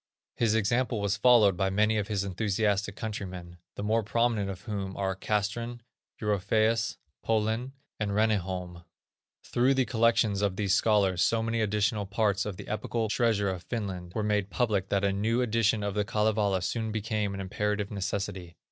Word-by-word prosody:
His 115 Hz, -2 st, +2 dB
example 115 Hz, +2 st, +1 dB
was 100 Hz, -1 st, 0 dB
followed 110 Hz, -3 st, +5 dB
by 95 Hz, +1 st, 0 dB
many 105 Hz, +3 st, +2 dB
of 100 Hz, -, -2 dB
his 100 Hz, -3 st, -1 dB
enthusiastic 100 Hz, +1 st, 0 dB
countrymen, 90 Hz, -5 st, -6 dB, 0.2 s
the -, -, -5 dB
more 110 Hz, +2 st, +2 dB
prominent 110 Hz, -1 st, 0 dB
of 95 Hz, -1 st, -6 dB
whom 100 Hz, -3 st, -5 dB
are 95 Hz, -1 st, -1 dB
Castrén, 110 Hz, +5 st, -2 dB, 0.4 s
Europæus, 110 Hz, +2 st, +1 dB, 0.3 s
Polén 115 Hz, +4 st, 0 dB, 0.3 s
and 105 Hz, -1 st, -1 dB
Reniholm. 95 Hz, -4 st, -1 dB, 0.6 s
Through 130 Hz, +3 st, +2 dB
the 130 Hz, -1 st, +2 dB
collections 115 Hz, -2 st, +2 dB
of 100 Hz, -2 st, 0 dB
these 100 Hz, -2 st, +1 dB
scholars 100 Hz, -4 st, +3 dB
so 115 Hz, +6 st, +2 dB
many 115 Hz, 0 st, 0 dB
additional 105 Hz, 0 st, 0 dB
parts 100 Hz, 0 st, 0 dB
of 100 Hz, -3 st, -5 dB
the -, -, -9 dB
epical 110 Hz, +1 st, -2 dB
treasure 105 Hz, -3 st, +2 dB
of 90 Hz, -2 st, -5 dB
Finland 95 Hz, -5 st, -5 dB
were 110 Hz, -, 0 dB
made 105 Hz, -2 st, 0 dB
public 105 Hz, -5 st, 0 dB
that 100 Hz, -1 st, +1 dB
a 100 Hz, -, +2 dB
new 110 Hz, +4 st, 0 dB
edition 115 Hz, -2 st, +1 dB
of 100 Hz, -1 st, -2 dB
the 105 Hz, 0 st, +1 dB
Kalevala 105 Hz, -3 st, +1 dB
soon 110 Hz, +4 st, -2 dB
became 105 Hz, -2 st, -2 dB
an -, -, -6 dB
imperative 105 Hz, +1 st, -2 dB
necessity. 95 Hz, -3 st, -4 dB
105 Hz, 165 wpm, -28 LUFS, 100-110 Hz, 0.6 s, followed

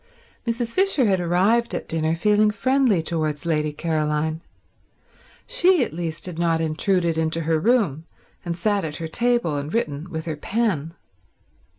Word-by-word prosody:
Mrs. 230 Hz, 0 st, -2 dB
Fisher 380 Hz, -9 st, +2 dB
had 195 Hz, -3 st, +2 dB
arrived 190 Hz, +7 st, +2 dB
at -, -, -5 dB
dinner 160 Hz, 0 st, 0 dB
feeling 210 Hz, +4 st, +3 dB
friendly 235 Hz, -3 st, +2 dB
towards 155 Hz, -3 st, -2 dB
Lady 150 Hz, -2 st, 0 dB
Caroline. 155 Hz, 0 st, -1 dB, 1.0 s
She 375 Hz, -, +3 dB
at -, -, -5 dB
least 165 Hz, -1 st, -4 dB
had 175 Hz, -3 st, -6 dB
not 165 Hz, -1 st, +2 dB
intruded 165 Hz, +1 st, 0 dB
into 160 Hz, +1 st, 0 dB
her 160 Hz, 0 st, +1 dB
room 175 Hz, -, +1 dB, 0.4 s
and 170 Hz, -1 st, -4 dB
sat 205 Hz, +2 st, 0 dB
at 155 Hz, -2 st, -4 dB
her 165 Hz, 0 st, -5 dB
table 235 Hz, -5 st, +1 dB
and 145 Hz, +2 st, -4 dB
written 155 Hz, -6 st, -2 dB
with 160 Hz, -2 st, -5 dB
her 160 Hz, -2 st, -3 dB
pen. 170 Hz, -4 st, -1 dB
170 Hz, 155 wpm, -23 LUFS, 160-220 Hz, 1.0 s, feeling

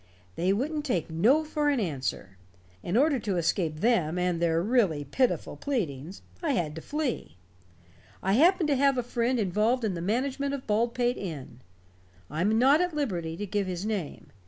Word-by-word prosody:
They 180 Hz, +3 st, +1 dB
wouldn't 295 Hz, +9 st, -1 dB
take 180 Hz, -, -1 dB
no 235 Hz, -, +3 dB
for 300 Hz, -1 st, 0 dB
an 280 Hz, -3 st, +1 dB
answer. 135 Hz, -, -3 dB, 0.5 s
In 175 Hz, -, -1 dB
order 285 Hz, 0 st, +3 dB
to 200 Hz, -5 st, -2 dB
escape 165 Hz, -2 st, 0 dB
them 180 Hz, -8 st, +2 dB
and 180 Hz, -1 st, 0 dB
their 165 Hz, -1 st, +2 dB
really 200 Hz, -, +2 dB
pitiful 250 Hz, -, 0 dB
pleadings, 180 Hz, -, -4 dB, 0.2 s
I 320 Hz, -5 st, 0 dB
had 160 Hz, -, -1 dB
to 160 Hz, -, -7 dB
flee. 290 Hz, -, -3 dB, 0.9 s
I 190 Hz, -, +2 dB
happened 330 Hz, -, +4 dB
to 285 Hz, -, +3 dB
have 275 Hz, 0 st, +3 dB
a 250 Hz, -, 0 dB
friend 240 Hz, +1 st, 0 dB
involved 215 Hz, +5 st, +1 dB
in 210 Hz, -4 st, 0 dB
the 170 Hz, -, -4 dB
management 265 Hz, +8 st, -1 dB
of 265 Hz, -, -8 dB
Baldpate 240 Hz, +3 st, +1 dB
Inn. 155 Hz, -10 st, -7 dB, 0.7 s
I 155 Hz, +3 st, -2 dB
am 215 Hz, +4 st, +2 dB
not 275 Hz, +7 st, +5 dB
at 360 Hz, -3 st, -1 dB
liberty 175 Hz, -, -2 dB
to 205 Hz, -, -3 dB
give 200 Hz, 0 st, -1 dB
his 180 Hz, +1 st, -4 dB
name. 205 Hz, -8 st, -4 dB
215 Hz, 180 wpm, -28 LUFS, 170-265 Hz, 0.9 s, not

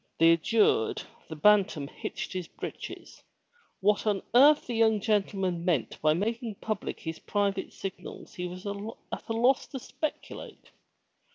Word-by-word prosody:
Thus 165 Hz, +1 st, +6 dB
adjured, 205 Hz, -, +2 dB, 0.3 s
the 160 Hz, -, -5 dB
Bantam 195 Hz, -4 st, +4 dB
hitched -, -, -6 dB
his 180 Hz, -3 st, -4 dB
breeches. -, -, -8 dB, 0.6 s
What 210 Hz, +2 st, +2 dB
on 205 Hz, -2 st, +1 dB
earth 285 Hz, +5 st, +7 dB
the 245 Hz, -, -4 dB
young 220 Hz, -2 st, +4 dB
gentleman 195 Hz, -4 st, 0 dB
meant 170 Hz, -9 st, 0 dB
by 155 Hz, 0 st, +4 dB
making 225 Hz, +3 st, -2 dB
public 215 Hz, 0 st, -4 dB
his 160 Hz, 0 st, -5 dB
private 200 Hz, -2 st, -1 dB
signals 195 Hz, -1 st, -8 dB
he 180 Hz, -3 st, -4 dB
was 180 Hz, +2 st, -9 dB
at 205 Hz, +4 st, -6 dB
a -, -, 0 dB
loss 245 Hz, +4 st, +3 dB
to 270 Hz, -, -6 dB
speculate. 300 Hz, +4 st, -6 dB
200 Hz, 145 wpm, -29 LUFS, 180-225 Hz, 0.6 s, earth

